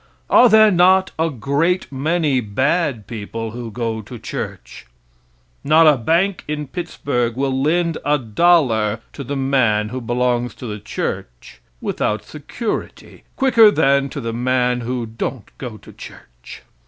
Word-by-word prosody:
Are 245 - +7
there 215 -1 +6
not 185 +1 +4
a 165 +1 +2
great 145 +8 -1
many 145 0 0
bad 130 - -1
people 115 0 -6
who 120 0 -7
go 115 0 -3
to 115 +4 -10
church? 65 - -7 0.8
Not 155 +3 +5
a 150 -2 +6
bank 170 - 0
in 150 0 -3
Pittsburgh 135 -7 -3
will 135 0 -1
lend 165 +2 +1
a 150 +1 +2
dollar 115 -5 +2
to 140 - -7
the 140 +3 -4
man 125 -6 +1
who 130 +2 -5
belongs 120 +1 -1
to - - -9
the 105 -2 -5
church, - - -6 0.2
without 105 0 -2
security, 155 - -6
quicker 235 -5 +6
than 140 -7 +2
to 140 - -6
the 115 -3 -4
man 125 0 0
who 120 0 -3
don't 115 +1 -6
go 120 -5 -7
to - - -15
church. - - -13
130 Hz, 145 wpm, -19 LUFS, 115-160 Hz, 0.8 s, Are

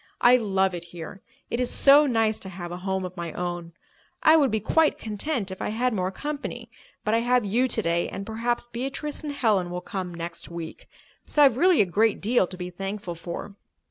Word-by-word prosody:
I 245 +1 +7
love 190 -5 +1
it 175 -1 -6
here. 175 +3 -9 0.3
It 235 - -1
is 250 - +1
so 285 +2 +6
nice 225 -3 +1
to 190 - -7
have 175 -1 -7
a 175 - -5
home 190 0 -2
of 180 0 -7
my 170 -3 -5
own. 175 -1 -4 0.5
I 315 - +7
would 290 -4 +4
be 220 - 0
quite 315 +9 +2
content 220 0 -2
if 190 - -7
I - - -1
had 245 +3 0
more 185 -3 0
company. 290 +8 -6 0.3
But 215 - 0
I 230 - +4
have 245 -1 +2
you 235 +6 +2
today, 170 -7 0
and 195 +1 -6
perhaps 230 +3 -2
Beatrice 270 +6 -4
and 300 - -3
Helen 215 -10 +1
will 180 0 -3
come 185 -1 -5
next 170 0 -7
week. 170 -1 -8 0.4
So 295 - +4
I've 270 -5 +6
really 355 +2 +5
a - - +4
great 210 +4 +2
deal 220 -2 +2
to 185 - -9
be 180 0 -6
thankful 195 0 -5
for." 170 +4 -7
205 Hz, 210 wpm, -25 LUFS, 180-245 Hz, 0.5 s, I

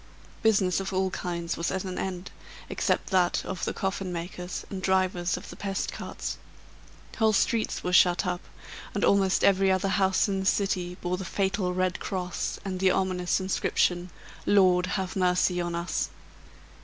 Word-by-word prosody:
Business 195 -5 +3
of 195 0 -4
all 190 0 +1
kinds 170 -2 -3
was 170 - -1
at 190 0 -2
an 185 -1 -4
end, 185 -1 -4 0.4
except - - 0
that 180 -2 +2
of 190 -2 -3
the - - -1
coffin 190 -1 -3
makers 180 +1 -5
and 190 -2 -4
drivers 185 -2 +1
of - - -9
the - - -9
pest 195 -1 -3
cart. - - -5 0.8
Whole 220 -1 +4
streets 225 +2 +1
were 180 - -2
shut 175 +1 +5
up, 180 -1 -2 0.5
and - - +2
almost 195 -1 +3
every 195 -1 +4
other 190 +1 +1
house 190 0 +2
in 195 -1 -1
the 190 - -3
city 185 -3 0
bore 180 +1 -1
the 190 - -5
fatal 190 0 0
red 185 0 0
cross, 180 -2 -3
and 185 -2 -3
the 190 0 +4
ominous 180 -1 +1
inscription, 180 -1 0 0.4
"Lord 185 -3 +5
have 190 -1 -3
mercy 180 -1 +2
on 175 0 -2
us". 170 +1 -1
185 Hz, 165 wpm, -27 LUFS, 180-195 Hz, 0.8 s, shut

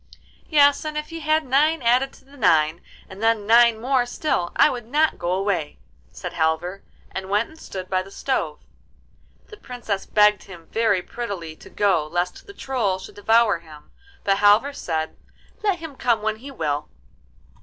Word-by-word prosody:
'Yes, 285 -1 +5
and 305 -1 -4
if 300 0 -4
he 330 0 -6
had 310 0 +1
nine 295 +4 +2
added 250 +3 +3
to - - -19
the 280 +1 -18
nine, 160 - +2 0.3
and 190 +2 -11
then 225 -2 +2
nine 230 0 +5
more 250 +1 +1
still, 245 - -1
I - - +6
would 240 -3 -4
not 305 +5 +1
go 175 +1 -1
away,' 185 -5 -1 0.3
said - - -7
Halvor, 160 +4 -1 0.3
and 190 0 -6
went 210 +3 +1
and 315 0 -16
stood 185 -9 -7
by 185 0 0
the 190 - -11
stove. 180 - -2 0.9
The 425 - -11
Princess 235 - -5
begged 210 -1 +4
him 175 -4 -12
very 220 -5 +2
prettily 195 -10 -6
to - - -14
go 185 -7 +1
lest 175 +3 -3
the 400 - -10
Troll 230 -8 -1
should 190 - -11
devour 220 -2 +3
him; 155 -3 -15 0.3
but 195 0 +2
Halvor 210 +7 +4
said, 160 - -3 0.5
'Let 400 -4 +2
him 320 -4 -9
come 235 -4 +1
when 215 0 -1
he 265 +5 -10
will. 150 - -3
215 Hz, 175 wpm, -23 LUFS, 185-265 Hz, 0.9 s, I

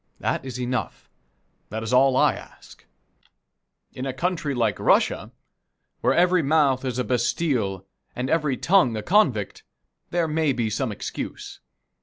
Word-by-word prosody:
That - - -1
is 130 -2 -6
enough. 125 0 -4 0.6
That 110 +2 -4
is 110 - -3
all 130 +1 +5
I - - +4
ask. - - -14 1.1
In 130 +1 -5
a 135 - -3
country 160 -1 -2
like 115 -4 0
Russia, - - +2 0.7
where - - +2
every 180 0 +4
mouth 140 -3 +2
is 130 -2 -3
a 125 - 0
bastile 120 - -1 0.3
and 125 +1 -2
every 150 -4 +1
tongue 170 - +3
a 105 - -4
convict, 150 - +1 0.5
there 170 -1 0
may 155 -2 +1
be 115 -3 -1
some 130 +2 -1
excuse. 100 - -6
130 Hz, 145 wpm, -24 LUFS, 120-160 Hz, 1.1 s, all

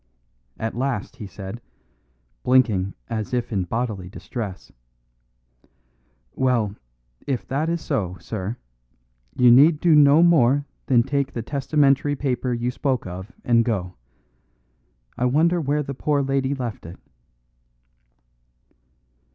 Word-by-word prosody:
At 110 0 -3
last 130 -2 -3
he 105 -5 -7
said, 100 +4 -8 0.8
blinking 110 -7 +2
as 115 +1 -3
if 120 -1 -2
in 95 -3 0
bodily 105 -3 -3
distress: 100 -1 -7 1.6
"Well, 120 -6 0 0.5
if 130 -4 -2
that 145 +5 -1
is 170 -1 -1
so, 95 - -2
sir, 110 +2 -5 0.8
you 125 -1 +6
need 145 +5 +6
do 170 -1 +4
no 150 +2 +6
more 145 -5 +4 0.2
than 120 -3 +4
take 140 +1 -1
the 115 - -4
testamentary 140 +1 +1
paper 130 -2 -2
you 120 +1 -1
spoke 130 -2 -1
of 95 +4 -7
and 115 -1 +3
go. 95 -6 -2 1.3
I 125 - +1
wonder 165 +7 +2
where 150 +1 0
the 140 - -5
poor 145 +1 0
lady 135 0 0
left 120 -9 -5
it." 85 - -10
125 Hz, 120 wpm, -23 LUFS, 110-140 Hz, 1.6 s, you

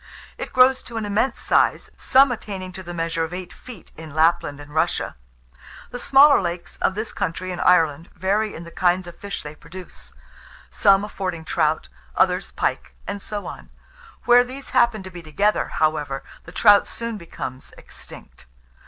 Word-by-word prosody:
It - - -7
grows 255 +1 +5
to 235 - -8
an 220 - -2
immense 205 +6 0
size, - - +1
some 265 0 +4
attaining 195 -5 -5
to 190 - -8
the 175 -1 -8
measure 165 -1 -2
of 165 +2 -4
eight 180 -1 -7
feet, 235 -9 -13
in 155 -2 -10
Lapland 155 -2 +2
and 145 0 -12
Russia. 160 +2 0 0.8
The 245 - -6
smaller 280 +1 +6
lakes, 170 -2 -5
of 190 - 0
this 215 +2 -4
country 185 +2 -3
and 180 - -4
Ireland, 165 -2 +3
vary 205 +4 0
in 165 - -8
the 170 - -11
kinds 180 +1 +1
of 175 - -12
fish 200 0 -6
they 150 0 -7
produce; 170 +4 -11 0.6
some 200 0 +4
affording 185 -5 -5
trout, 155 -1 0 0.3
others 185 0 +1
pike; - - -2
and 200 0 -5
so 205 0 -5
on. - - -9 0.6
Where 245 0 +7
these 260 +2 -9
happen 225 -4 +3
to 190 - -9
be 175 -1 -9
together, 195 +7 0
however, 150 -3 -1 0.2
the - - -11
trout 205 -2 +5
soon 230 -2 -5
becomes 135 -6 -7
extinct. - - -12
185 Hz, 170 wpm, -22 LUFS, 165-215 Hz, 0.8 s, Where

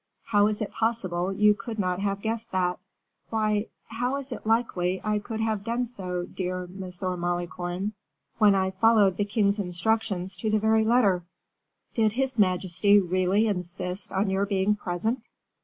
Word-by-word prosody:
How 205 -2 +3
is 215 0 -1
it 205 - -6
possible 190 -6 -1
you 210 +2 +4
could 210 +3 -7
not 180 -3 0
have 200 0 -2
guessed 225 +1 -2
that?" 180 -1 0 0.5
"Why, 215 -1 0 0.2
how 245 +3 -2
is 280 -1 -6
it 225 -2 -6
likely 190 -5 +1
I 210 -1 0
could 220 +1 -6
have 220 -2 -1
done 235 +3 -1
so, 180 -7 -4
dear 180 0 -4
M. 180 +2 -11 0.4
Malicorne, 175 +3 -3 0.5
when 210 -2 +6
I 190 0 +1
followed 200 -1 +4
the 205 - +1
king's 205 0 +1
instructions 190 0 -1
to 215 +4 -2
the 215 - +3
very 220 +1 +3
letter?" 215 -7 +3 0.7
"Did 220 -2 +2
his 260 -1 0
majesty 190 +1 +4
really 185 +3 +2
insist 180 -1 -3
on 195 +1 0
your 195 +1 +1
being 200 +1 +1
present?" 220 +6 -3
205 Hz, 160 wpm, -26 LUFS, 185-220 Hz, 0.7 s, when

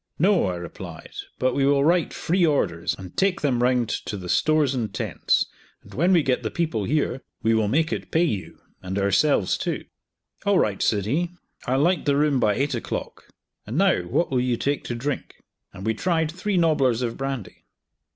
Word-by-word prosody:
"No," 185 - +3
I 90 - -2
replied; 85 -1 -9 0.3
"but 130 0 +1
we 140 - +1
will 140 0 +3
write 170 0 +3
free 180 +2 0
orders, 140 - +1
and 95 -2 -10
take 195 -2 +1
them 130 -5 +1
round 125 -1 +2
to 105 - -3
the 90 -2 -7
stores 155 - +3
and 115 -6 -2
tents, 95 - 0 0.4
and - - -15
when 175 +7 +2
we 170 -4 +5
get 130 -2 +1
the 110 - -2
people 155 - -1
here, 135 -1 0 0.2
we 115 - +3
will 110 -2 +2
make 160 +8 +1
it - - -5
pay 165 - +2
you 105 - -2 0.2
and 95 +1 -4
ourselves 100 +3 +2
too." - - -3 0.6
"All 200 -1 +3
right," 105 - +1
said 100 -3 +1
he; 160 +10 0 0.4
"I'll 130 +2 +2
light 180 +3 +2
the 140 -1 +2
room 145 -2 +2
by 105 -3 +2
eight 140 +1 0
o'clock; 120 - -5 0.4
and 115 +7 -3
now 195 0 +3
what 170 - 0
will 125 -2 +2
you 125 -1 0
take 140 +3 -1
to 120 - -3
drink?" 135 +3 -4 0.4
and 95 - -9
we 110 - +2
tried 160 +4 0
three 190 +3 -2
nobblers 140 -8 +2
of 115 -1 -2
brandy. 135 -9 -5
135 Hz, 200 wpm, -24 LUFS, 110-160 Hz, 0.6 s, we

